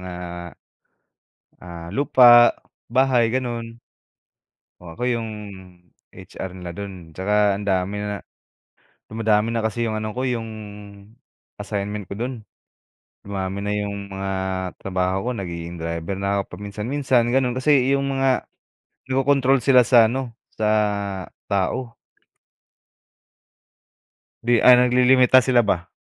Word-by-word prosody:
mga, 90 -1 -7 1.5
ah, 85 -1 -9
lupa, 120 +1 +6 0.3
bahay, 125 -3 +2
gano'n. 115 -2 -4 1.0
Oh, 85 -2 -11
ako - - -9
'yong 115 -2 -2 0.8
HR 95 - -8
nila 90 -1 -8
do'n. 90 -3 -8
'Tsaka 100 +3 +1
ang 105 - -7
dami 95 +1 0
na 105 -1 -4 0.9
dumadami 110 0 +1
na 115 - -1
kasi 115 +2 -3
'yong 110 -2 -1
ano 110 -1 -5
ko, 130 - -3
'yong 115 -3 -2 1.1
assignment 105 -1 -4
ko 100 - -7
do'n. 125 +5 -4 0.9
Dumami 100 -1 -4
na 105 0 -3
'yong 100 -1 -3
mga 95 0 -5 0.5
trabaho 95 +3 -1
ko, - - 0
nagiging 85 -2 -6
driver 85 +3 -4
na 100 +1 -1
ako 90 - -8
paminsan-minsan, 120 +5 -1
gano'n. 125 0 +1
Kasi 130 0 +3
iyong 140 0 0
mga 135 -1 +1 0.6
kinokontrol 135 -1 +2
sila 125 -3 +5
sa 115 -3 +6
ano, 130 -3 -4 0.2
sa 110 - -2 0.8
tao. 115 +5 -2 2.5
'Di 120 -1 +3
ah, 125 - +9
naglilimita 125 +1 +5
sila 125 -2 +3
ba. 90 -2 -1
110 Hz, 120 wpm, -22 LUFS, 95-125 Hz, 2.5 s, ah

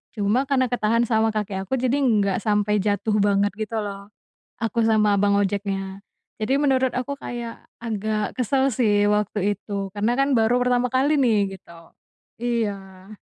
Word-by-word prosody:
cuma 215 +6 +1
karena 260 -2 +2
ketahan 230 -1 +1
sama 220 0 +2
kaki 200 -3 -3
aku 195 - -6
jadi 255 +2 +1
enggak 205 -6 +2
sampai 210 0 +1
jatuh 210 +1 0
banget 205 0 +2
gitu 220 +1 -4
loh, 200 0 -7 0.5
aku 225 +1 -1
sama 215 -2 +3
abang 200 0 +3
ojeknya, 195 -1 -2 0.4
jadi 265 +6 +1
menurut 265 -3 +2
aku 265 +3 -3
kayak 235 -3 -6 0.2
agak 215 -1 -2
kesel 265 +2 +1
sih 205 -3 +2
waktu 205 -1 0
itu 200 -2 -5
karena 215 +3 0
kan 275 0 +2
baru 225 +2 +3
pertama 250 0 +1
kali 265 +5 +2
nih 205 -6 +2
gitu, 165 -1 -17 0.5
iya. 200 -4 -3
215 Hz, 155 wpm, -23 LUFS, 200-240 Hz, 0.5 s, sama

